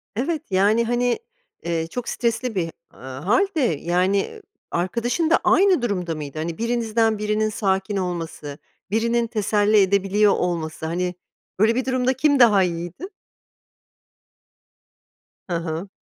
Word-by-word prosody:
Evet, 295 Hz, +8 st, -1 dB
yani, 205 Hz, +5 st, +3 dB
hani, 245 Hz, -, 0 dB, 0.4 s
eee, 165 Hz, -1 st, -2 dB
çok 245 Hz, +6 st, -5 dB
stresli 235 Hz, -1 st, -1 dB
bir, 165 Hz, -3 st, -1 dB, 0.2 s
ııı, 130 Hz, 0 st, -9 dB
hâl 210 Hz, -, +3 dB
de, 305 Hz, -, +1 dB, 0.2 s
yani, 180 Hz, +3 st, +1 dB
eee, 440 Hz, -, -3 dB, 0.3 s
arkadaşın 235 Hz, -, 0 dB
da 335 Hz, -, +4 dB
aynı 380 Hz, -7 st, +4 dB
durumda 180 Hz, -8 st, -2 dB
mıydı? 150 Hz, -1 st, -7 dB
Hani, 160 Hz, +1 st, -4 dB
birinizden 225 Hz, -1 st, +1 dB
birinin 215 Hz, +1 st, 0 dB
sakin 195 Hz, -1 st, -1 dB
olması, 165 Hz, -5 st, -4 dB, 0.3 s
birinin 230 Hz, +2 st, +1 dB
teselli 210 Hz, -1 st, +2 dB
edebiliyor 200 Hz, +2 st, +3 dB
olması, 160 Hz, -3 st, -2 dB
hani, 180 Hz, +2 st, -2 dB, 0.4 s
böyle 220 Hz, +3 st, +4 dB
bir 255 Hz, +1 st, -1 dB
durumda 255 Hz, 0 st, +1 dB
kim 285 Hz, +2 st, +2 dB
daha 210 Hz, -6 st, +6 dB
iyiydi? 175 Hz, -, -4 dB, 2.4 s
Hı 180 Hz, -, -3 dB
hı. 165 Hz, +3 st, -4 dB
205 Hz, 130 wpm, -22 LUFS, 175-235 Hz, 2.4 s, daha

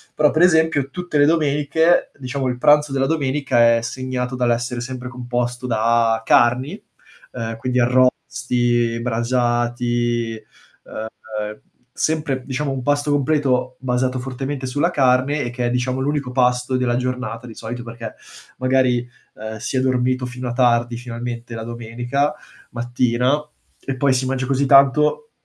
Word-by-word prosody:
Però, 150 Hz, -1 st, +4 dB
per 155 Hz, -, +1 dB
esempio, 160 Hz, -5 st, +3 dB
tutte 175 Hz, 0 st, -3 dB
le 145 Hz, -, +6 dB
domeniche, 155 Hz, +2 st, +2 dB
diciamo 130 Hz, 0 st, -3 dB
il 125 Hz, -1 st, -2 dB
pranzo 150 Hz, +1 st, +4 dB
della 135 Hz, 0 st, +1 dB
domenica, 135 Hz, -6 st, +2 dB
è 115 Hz, -, 0 dB
segnato 130 Hz, +1 st, -3 dB
dall'essere 120 Hz, 0 st, 0 dB
sempre 125 Hz, 0 st, -6 dB
composto 125 Hz, 0 st, -3 dB
da 115 Hz, 0 st, +2 dB
carni, 130 Hz, -, +2 dB, 0.5 s
uhm, 115 Hz, -2 st, -4 dB
quindi 125 Hz, +2 st, -1 dB
arrosti, 120 Hz, -1 st, +1 dB
brasati, 120 Hz, -1 st, 0 dB, 1.1 s
uhm, 110 Hz, -, -10 dB, 0.3 s
sempre 150 Hz, -5 st, -1 dB
diciamo 140 Hz, +1 st, -2 dB
un 130 Hz, -2 st, -4 dB
pasto 145 Hz, +2 st, +1 dB
completo 135 Hz, -3 st, +1 dB
basato 130 Hz, 0 st, -1 dB
fortemente 135 Hz, +1 st, -4 dB
sulla 145 Hz, +7 st, 0 dB
carne 135 Hz, +1 st, +2 dB
e 120 Hz, -, -3 dB
che 120 Hz, 0 st, -2 dB
è -, -, 0 dB
diciamo 125 Hz, +1 st, -1 dB
l'unico 140 Hz, -1 st, -1 dB
pasto 125 Hz, 0 st, +1 dB
della 120 Hz, -1 st, +1 dB
giornata 125 Hz, -2 st, -3 dB
di 115 Hz, -, -10 dB
solito, 120 Hz, +2 st, -6 dB
perché 115 Hz, -1 st, -8 dB, 0.4 s
magari, 130 Hz, -2 st, +2 dB, 0.3 s
uhm, 110 Hz, +1 st, -7 dB
si 130 Hz, +3 st, -4 dB
è -, -, +3 dB
dormito 130 Hz, 0 st, +1 dB
fino 125 Hz, 0 st, -6 dB
a -, -, -2 dB
tardi 120 Hz, -1 st, +2 dB
finalmente 120 Hz, -1 st, -6 dB
la 115 Hz, -, -5 dB
domenica 120 Hz, +5 st, -2 dB, 0.4 s
mattina, 125 Hz, +4 st, 0 dB, 0.4 s
e 135 Hz, -1 st, -3 dB
poi 135 Hz, 0 st, +2 dB
si 130 Hz, 0 st, 0 dB
mangia 130 Hz, 0 st, -1 dB
così 135 Hz, +1 st, +1 dB
tanto, 145 Hz, -, +4 dB
125 Hz, 145 wpm, -20 LUFS, 120-135 Hz, 1.1 s, le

